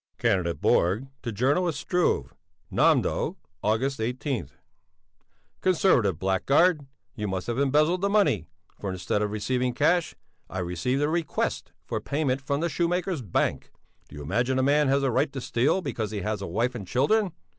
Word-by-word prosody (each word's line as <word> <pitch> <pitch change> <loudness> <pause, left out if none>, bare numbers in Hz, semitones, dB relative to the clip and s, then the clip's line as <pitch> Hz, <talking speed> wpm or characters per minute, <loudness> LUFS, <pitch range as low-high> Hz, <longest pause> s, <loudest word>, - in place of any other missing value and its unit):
CANDIDATE 90 -9 0
BORG 105 +10 +2
to 120 - -4
JOURNALIST 145 - +1
STRUVE 180 -1 0 0.4
NÄMDÖ, - - +2 0.3
August 110 +5 0
18 125 - -2 1.1
CONSERVATIVE 145 - +3
BLACKGUARD, 140 - +2 0.3
You 105 -1 -4
must 95 -1 -3
have 120 +2 -2
embezzled 150 +6 +2
the 200 - +1
money, 195 - +2 0.3
for 100 - -4
instead 95 +2 -1
of 105 - 0
receiving 125 +4 -1
cash, 170 +5 +2 0.3
I 95 - -6
received 95 - -1
a - - +2
request 165 0 -2
for - - -3
payment 140 -2 -1
from 140 +2 -1
the 170 - +1
Shoemakers' 175 -1 -1
Bank. 100 -8 -1 0.4
Do - - -12
you 75 - -7
imagine 120 - 0
a 130 - +2
man 145 +2 +3
has 140 +1 +2
a 135 - +2
right 135 +4 +1
to 135 - -4
steal 130 +9 +1
because 115 -7 -3
he 105 -1 -4
has 105 +1 -2
a 100 - -4
wife 115 +8 0
and 105 -7 -7
children? 180 - +2
130 Hz, 165 wpm, -26 LUFS, 105-150 Hz, 1.1 s, CONSERVATIVE